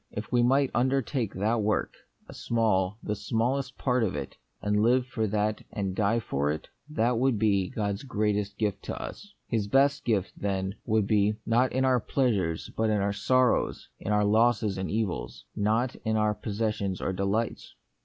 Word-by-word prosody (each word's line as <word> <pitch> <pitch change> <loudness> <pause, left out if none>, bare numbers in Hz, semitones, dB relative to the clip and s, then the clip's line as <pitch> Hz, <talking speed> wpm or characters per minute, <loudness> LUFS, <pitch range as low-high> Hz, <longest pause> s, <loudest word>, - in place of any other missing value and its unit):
If 105 - -6
we 120 -1 +4
might 135 +3 +3
undertake 130 -2 0
that 110 +4 +1
work, 105 +1 0 0.3
a - - -10
small, 105 -4 0
the 105 - -2
smallest, 125 +6 -1
part 125 -2 +1
of 105 - -1
it, - - -5 0.2
and 105 0 +1
live 125 +3 +3
for 115 -3 -2
that 105 +1 0
and 95 -4 -3
die 110 +3 +2
for 70 -9 -1
it, 75 +1 -4 0.2
that 120 -4 +1
would 130 -2 +2
be 100 -3 +2
God's 100 -2 -2
great 105 -6 0
est 100 -1 -3
gift 100 -2 -1
to - - -4
us. 205 0 -8
His 110 -4 -1
best 135 +6 +3
gift, 105 -5 0
then, 95 -1 -2
would 110 -2 +2
be, 105 0 +2
not 120 +3 +2
in 130 +1 +1
our 130 -1 +3
pleasures 105 - 0
but 110 0 +1
in 105 -1 +2
our 100 0 0
sorrows; 130 +3 +1
in 105 - -3
our 105 0 +3
losses 110 -1 +3
and 95 - -3
evils, 95 - -3
not 110 +5 +1
in 110 -1 -1
our 105 0 +2
possessions 105 -3 -2
or 95 - -2
delights. 100 +5 -2
110 Hz, 185 wpm, -28 LUFS, 100-120 Hz, 0.3 s, we